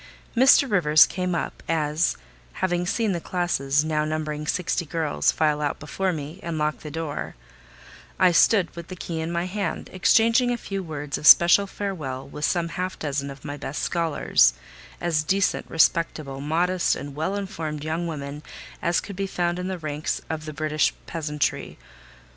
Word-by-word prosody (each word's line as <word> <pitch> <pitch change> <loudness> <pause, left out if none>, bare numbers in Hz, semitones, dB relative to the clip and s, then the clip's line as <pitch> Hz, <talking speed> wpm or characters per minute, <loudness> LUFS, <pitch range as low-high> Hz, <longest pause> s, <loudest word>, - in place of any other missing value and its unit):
Mr. 265 +3 +6
Rivers 155 - +6
came 180 -1 -2
up - - -4
as, 155 0 +1 0.4
having 175 -1 -1
seen 220 +2 0
the 170 -2 -2
classes, 150 -6 0
now 155 -1 0
numbering 155 -1 -3
sixty 175 0 0
girls, 160 -2 0
file 150 -2 +1
out 145 -1 -2
before 190 +5 -2
me, 155 +2 -6
and 170 -3 -4
locked 150 0 -1
the 150 - -7
door, 155 -1 -5 0.8
I 185 -1 +5
stood 180 +1 +3
with 170 -1 -8
the 185 - -7
key 170 -2 -5
in 160 +1 -3
my 170 +1 -1
hand, 195 -1 -4
exchanging 230 +6 +4
a 245 - 0
few 195 -3 -4
words 150 -5 -5
of 150 - 0
special 175 +4 +8
farewell 155 -11 -5
with 150 +2 -3
some 170 -2 0
half 185 +2 -4
dozen 140 -1 -3
of 140 +1 -11
my 145 0 -5
best 140 +1 -5
scholars: 160 - +2 0.4
as 165 -3 +1
decent, 190 +5 0
respectable, 155 -4 +1
modest, 175 +5 +1
and 145 0 -7
well 160 +7 -2
informed 160 -7 -4
young 160 +2 -2
women 145 -2 -6 0.4
as 170 0 +1
could 200 - -8
be 195 +1 -2
found 175 -1 -1
in 180 - -3
the 190 -1 -3
ranks 155 0 -3
of 155 -1 -4
the 155 - -6
British 155 0 0
peasantry. 150 -3 -2
165 Hz, 170 wpm, -24 LUFS, 150-180 Hz, 0.8 s, special